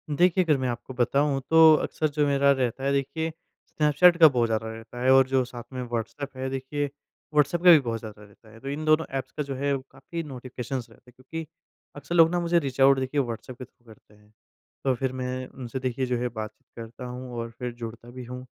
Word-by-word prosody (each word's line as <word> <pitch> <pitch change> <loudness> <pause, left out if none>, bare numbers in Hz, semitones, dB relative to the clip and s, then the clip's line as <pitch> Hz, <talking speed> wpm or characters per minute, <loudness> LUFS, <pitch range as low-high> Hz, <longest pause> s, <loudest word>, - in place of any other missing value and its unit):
देखिए, 180 +2 +4
अगर 155 -4 +2
मैं 130 -1 -2
आपको 120 +2 -6
बताऊँ 135 +3 +1
तो 160 -1 +8
अक्सर 155 - -1
जो 145 +1 +1
मेरा 140 0 +4
रहता 130 -1 -1
है 140 - +1
देखिए 140 +4 -1 0.4
स्नैपचैट 165 +4 +4
का 160 -2 +9
बहुत 125 -4 +2
ज़्यादा 110 0 -1
रहता 115 +2 -10
है 130 - +5
और 135 -1 +6
जो 130 -1 +2
साथ 120 -1 -9
में 130 - -4
व्हाट्सएप 120 +4 -5
है 130 0 -3
देखिए 135 +2 -3 0.5
व्हाट्सएप 150 +3 +2
का 180 - +9
भी 160 - +8
बहुत 115 -4 -3
ज़्यादा 105 -1 -10
रहता 105 +2 -19
है। 115 - -15
तो 135 - -7
इन 150 +2 -4
दोनों 155 +1 +3
ऐप्स 130 - -5
का 150 - 0
जो 135 -1 -5
है 140 +1 0 0.2
काफ़ी 165 +5 -7
नोटिफिकेशंस 130 -2 -6
रहते 125 - -20
हैं। - - -37
क्योंकि 160 +6 -7 0.5
अक्सर 145 +4 -5
लोग 165 -1 +7
ना 175 - +1
मुझे 170 0 +2
रीच 135 -4 -5
आउट 135 0 +6
देखिए 135 +2 0
व्हाट्सएप 120 0 -6
के 130 - -8
थ्रू 120 -1 -36
करते 105 - -25
हैं। 105 0 -24 0.5
तो 135 -1 +2
फ़िर 130 +1 -2
मैं 130 0 -4
उनसे 130 0 -7
देखिए 130 0 -2
जो 125 -1 -1
है 125 - -1
बातचीत 110 -1 -8
करता 115 +3 -8
हूँ 125 0 -7
और 115 0 -4
फ़िर 125 -1 -3
जुड़ता 115 0 -9
भी 125 0 -8
हूँ। 125 +1 -8
130 Hz, 230 wpm, -26 LUFS, 120-145 Hz, 0.5 s, का